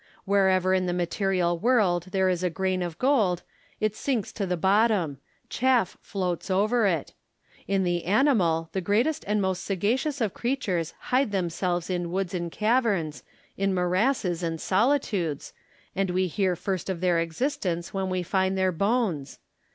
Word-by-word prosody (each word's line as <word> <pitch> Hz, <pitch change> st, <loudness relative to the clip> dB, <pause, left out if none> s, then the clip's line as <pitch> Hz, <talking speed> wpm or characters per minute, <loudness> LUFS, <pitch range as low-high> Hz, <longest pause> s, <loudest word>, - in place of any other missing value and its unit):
Wherever 190 Hz, -2 st, +3 dB
in 185 Hz, -1 st, +1 dB
the 175 Hz, -, 0 dB
material 175 Hz, -1 st, 0 dB
world 200 Hz, -7 st, +2 dB
there 190 Hz, 0 st, +2 dB
is 180 Hz, -1 st, 0 dB
a 180 Hz, -, +1 dB
grain 185 Hz, +2 st, -1 dB
of 170 Hz, -2 st, -4 dB
gold, 215 Hz, -10 st, +2 dB, 0.4 s
it 215 Hz, -1 st, 0 dB
sinks 245 Hz, -8 st, -2 dB
to 200 Hz, -3 st, -3 dB
the 180 Hz, 0 st, -1 dB
bottom; 190 Hz, -, +2 dB, 0.3 s
chaff 250 Hz, -7 st, +1 dB
floats 180 Hz, -3 st, -3 dB
over 210 Hz, +4 st, +2 dB
it: 165 Hz, -6 st, -1 dB, 0.5 s
in 195 Hz, -1 st, +1 dB
the 175 Hz, -1 st, -1 dB
animal, 185 Hz, -, +2 dB
the 190 Hz, -, -2 dB
greatest 235 Hz, -, +1 dB
and 210 Hz, +1 st, +1 dB
most 190 Hz, -2 st, -1 dB
sagacious 235 Hz, -, -1 dB
of 220 Hz, -6 st, 0 dB
creatures 200 Hz, -, -2 dB, 0.2 s
hide 255 Hz, -3 st, +3 dB
themselves 175 Hz, -2 st, -1 dB
in 175 Hz, -2 st, -2 dB
woods 190 Hz, 0 st, -2 dB
and 170 Hz, -2 st, -3 dB
caverns, 210 Hz, -, 0 dB, 0.4 s
in 195 Hz, -1 st, +1 dB
morasses 180 Hz, 0 st, +1 dB
and 165 Hz, -2 st, -2 dB
solitudes, 195 Hz, -, 0 dB, 0.4 s
and 195 Hz, 0 st, 0 dB
we 185 Hz, +1 st, +1 dB
hear 185 Hz, +1 st, 0 dB
first 185 Hz, +1 st, -3 dB
of 185 Hz, -3 st, -2 dB
their 175 Hz, -1 st, +2 dB
existence 175 Hz, -, -2 dB
when 190 Hz, -1 st, -1 dB
we 185 Hz, -1 st, -1 dB
find 190 Hz, +1 st, 0 dB
their 190 Hz, 0 st, +2 dB
bones. 190 Hz, -, -1 dB
190 Hz, 160 wpm, -26 LUFS, 175-210 Hz, 0.5 s, Wherever